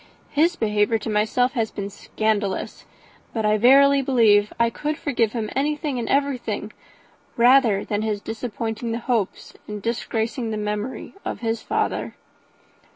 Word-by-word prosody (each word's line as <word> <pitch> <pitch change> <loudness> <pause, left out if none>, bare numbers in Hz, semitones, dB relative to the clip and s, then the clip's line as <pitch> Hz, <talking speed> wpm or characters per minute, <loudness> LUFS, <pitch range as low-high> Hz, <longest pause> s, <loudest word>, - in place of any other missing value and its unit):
His 330 +4 +3
behaviour 210 -1 +1
to 220 +1 -5
myself 220 +4 +2
has 230 -5 -1
been 200 0 -6
scandalous; 210 -1 -2 0.5
but 220 -2 -1
I 210 0 +3
verily 275 +4 +6
believe 220 -6 +4
I 235 0 +3
could 300 +5 -3
forgive 235 -6 0
him 225 -3 -2
anything 295 -1 -1
and 230 - -4
everything, 250 -7 -1 0.6
rather 240 -4 +5
than 205 0 -1
his 215 -2 -1
disappointing 225 +1 -4
the - - -1
hopes 230 -5 -2
and 210 0 -5
disgracing 230 +2 -2
the 215 - -3
memory 210 +4 -4
of - - -5
his 225 -1 -1
father." - - -2
225 Hz, 145 wpm, -23 LUFS, 210-255 Hz, 0.6 s, verily